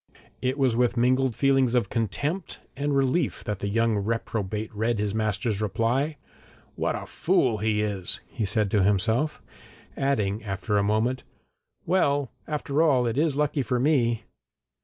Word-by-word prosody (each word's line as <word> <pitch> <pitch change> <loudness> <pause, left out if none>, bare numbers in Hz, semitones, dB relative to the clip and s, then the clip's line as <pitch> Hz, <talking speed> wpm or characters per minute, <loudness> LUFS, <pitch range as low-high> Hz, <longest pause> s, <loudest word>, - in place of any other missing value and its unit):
It 130 +2 0
was 130 -4 +2
with 120 0 +1
mingled 130 0 +2
feelings 135 -3 +3
of 115 -5 +1
contempt 145 - -2 0.2
and 140 0 0
relief 135 +6 0
that 105 -4 -3
the 100 - -3
young 115 +1 +1
reprobate 110 0 -3
read 110 +2 0
his 105 -1 -1
master's 110 -1 -1
reply. 120 +8 0 0.6
'What - - -1
a - - -5
fool 130 - +1
he 105 0 +1
is!' 100 -4 -1
he - - -5
said 105 0 0
to 105 - +3
himself, 110 +9 +1 0.5
adding 110 -6 0
after 100 +1 -2
a 100 - +4
moment 110 +5 +1 0.6
'Well, 145 -7 +1 0.2
after 150 -1 -1
all, 135 -6 +4
it 115 -1 -1
is 155 -3 +2
lucky 150 0 +1
for 125 0 -1
me!' 120 -5 +2
115 Hz, 155 wpm, -26 LUFS, 105-135 Hz, 0.6 s, a